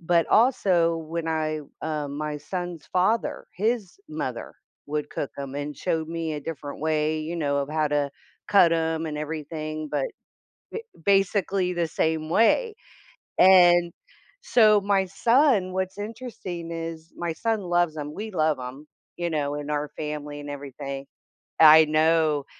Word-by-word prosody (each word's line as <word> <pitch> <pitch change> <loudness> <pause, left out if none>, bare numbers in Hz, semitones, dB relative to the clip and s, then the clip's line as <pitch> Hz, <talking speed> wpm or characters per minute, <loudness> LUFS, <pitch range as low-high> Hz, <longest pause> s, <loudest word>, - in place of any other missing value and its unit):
but 170 0 +2
also 185 -9 +3
when 165 0 -3
I, 155 -1 -1 0.2
um, 150 -2 -3
my 150 -1 -3
son's 175 +1 -6
father, 200 +6 +1
his 215 - -1
mother - - -5 0.3
would 150 0 -3
cook 140 - -4
'em 140 -1 -6
and 145 +1 -4
showed 160 -3 -2
me 165 -1 -3
a 150 - -4
different 145 -2 -7
way, 155 0 0
you 160 +3 -4
know, 145 -3 0
of 140 - -2
how 155 0 +1
to 145 -1 0 0.4
cut 180 -4 +6
'em 160 0 0
and 150 -1 -4
everything, 155 0 -5
but - - 0 0.9
b - - -21
basically 195 -2 +2
the 170 -2 -1
same 160 0 -1
way, 425 - +3 0.6
and 175 -2 +6 0.5
so 220 - +5
my 195 -1 +2
son, 230 -1 +3
what's 190 +1 -3
interesting 205 -6 -6
is 165 0 -6
my 170 -1 -2
son 225 +5 -1
loves 175 -3 +1
'em, 150 -1 -5
we 215 +2 -5
love 155 -6 +1
'em, 130 +4 -8 0.3
you 175 -1 -2
know, 145 -2 -1
in 145 0 -5
our 150 0 -1
family 150 -1 -5
and 145 0 -7
everything. 140 -1 -6 0.5
I 160 0 +9
know, 155 -1 +2
160 Hz, 150 wpm, -25 LUFS, 150-185 Hz, 0.9 s, I